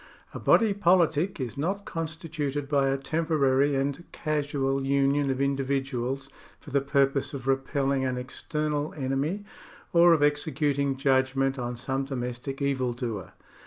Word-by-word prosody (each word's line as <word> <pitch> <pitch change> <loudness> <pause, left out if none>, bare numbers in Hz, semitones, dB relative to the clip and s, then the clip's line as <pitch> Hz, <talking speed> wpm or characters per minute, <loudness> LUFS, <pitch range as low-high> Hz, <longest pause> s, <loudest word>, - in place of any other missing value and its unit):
A - - -5
body 220 -3 +4
politic 175 -2 +2
is 130 +1 -4
not 195 +6 -2
constituted 155 -3 -4
by 140 -1 +2
a 135 - +1
tem 160 +4 -2
porary 140 -2 +3
and 140 +5 -2
casual 145 -3 -1
union 140 +1 +2
of 130 -1 -1
individuals, 135 -1 -1 0.3
for 145 - -12
the 140 +1 +2
purpose 140 +1 +1
of 130 -3 -7
repelling 135 0 0
an 130 -1 -1
external 150 +3 -3
enemy, 145 +8 -2 0.5
or 170 0 +7
of 155 -3 +3
executing 145 -2 +1
judgment 135 0 +1
on 120 0 -3
some 135 +2 -2
domestic 130 +1 -4
evildoer. 125 -7 -2
140 Hz, 135 wpm, -27 LUFS, 135-150 Hz, 0.5 s, or